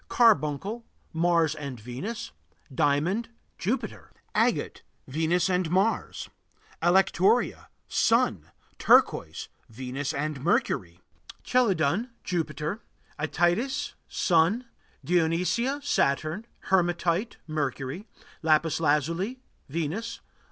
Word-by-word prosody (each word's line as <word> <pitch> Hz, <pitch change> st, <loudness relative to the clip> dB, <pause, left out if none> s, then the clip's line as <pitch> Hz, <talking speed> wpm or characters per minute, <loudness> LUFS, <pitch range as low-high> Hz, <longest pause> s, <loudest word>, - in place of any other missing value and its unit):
Carbuncle 210 Hz, -, +2 dB, 0.3 s
Mars 165 Hz, -2 st, +3 dB
and 140 Hz, -5 st, -6 dB
Venus. 130 Hz, -, -6 dB, 0.4 s
Diamond 155 Hz, -, +1 dB, 0.3 s
Jupiter. 230 Hz, +9 st, -3 dB, 0.2 s
Agate -, -, +1 dB, 0.3 s
Venus 165 Hz, +6 st, +1 dB
and 180 Hz, -2 st, +1 dB
Mars. 195 Hz, +6 st, 0 dB, 0.5 s
Alectoria 190 Hz, +5 st, +3 dB, 0.2 s
Sun. 110 Hz, -, +2 dB, 0.3 s
Turquoise -, -, +3 dB, 0.2 s
Venus 130 Hz, +4 st, -4 dB
and 145 Hz, -1 st, -3 dB
Mercury. 90 Hz, -, 0 dB, 0.4 s
Chelidon 205 Hz, -, +2 dB
Jupiter. 160 Hz, +3 st, -2 dB, 0.4 s
Ætites 175 Hz, -, 0 dB
Sun. 180 Hz, +8 st, +2 dB, 0.4 s
Dionesia 180 Hz, -, +1 dB
Saturn. 160 Hz, -, 0 dB, 0.2 s
Hematite 175 Hz, +2 st, +1 dB
Mercury. 150 Hz, -, -3 dB, 0.3 s
Lapis 155 Hz, 0 st, +2 dB
lazuli 165 Hz, -, 0 dB, 0.3 s
Venus. 170 Hz, +10 st, -3 dB
170 Hz, 80 wpm, -27 LUFS, 150-205 Hz, 0.5 s, Mars